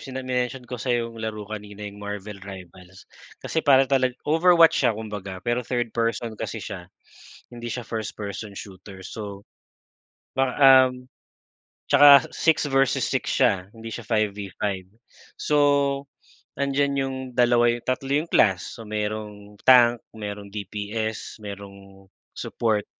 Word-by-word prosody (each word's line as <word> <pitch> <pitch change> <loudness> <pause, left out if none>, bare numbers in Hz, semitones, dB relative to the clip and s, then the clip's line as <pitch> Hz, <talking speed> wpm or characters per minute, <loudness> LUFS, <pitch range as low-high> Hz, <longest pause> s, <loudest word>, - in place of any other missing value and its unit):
sa 130 -1 -6
mention 125 0 -2
ko 125 0 -7
sa 130 - -7 0.3
laro 110 -1 -4
kanina 105 -1 -8
yung 105 0 -8
Marvel 105 0 -6
Rivals 95 -1 -12 0.3
kasi 160 - -2
para 135 -3 +5
tala 130 -2 +4 0.2
Overwatch 165 +2 +5
siya 110 - +2
kumbaga 105 -4 -7
pero 120 0 -1
third 120 -2 -1
person 115 -1 -2
kasi - - -5
siya, - - -7 0.6
hindi 120 -1 -7
siya 125 -2 -5
first 110 -2 -4
person 100 +1 -6
shooter, 95 0 -10
so, 100 -2 -7 0.9
ba 135 -1 0 0.3
um. 125 0 -10 0.8
Tsaka 140 0 +9 0.2
six-versus-six 140 -5 +1
siya 95 +1 +1
hindi 115 0 -10
siya 120 - -7
5V5, 100 -3 -2 0.5
so, 150 - +1 1.0
nandiyan 140 0 0
yung 135 -1 -1 0.2
dalawa 120 -1 +4
yung 120 - -7
tatlo 130 +1 -2 0.2
yung 170 - -12
class, 95 -2 +2
so, 115 - -9
merong 105 -1 -5
tank, 120 -2 +7 0.2
merong 105 -2 -6
DPS, 105 +2 -5
merong 100 -1 -10 0.2
support. 110 -3 -1
110 Hz, 130 wpm, -24 LUFS, 100-125 Hz, 1.0 s, Tsaka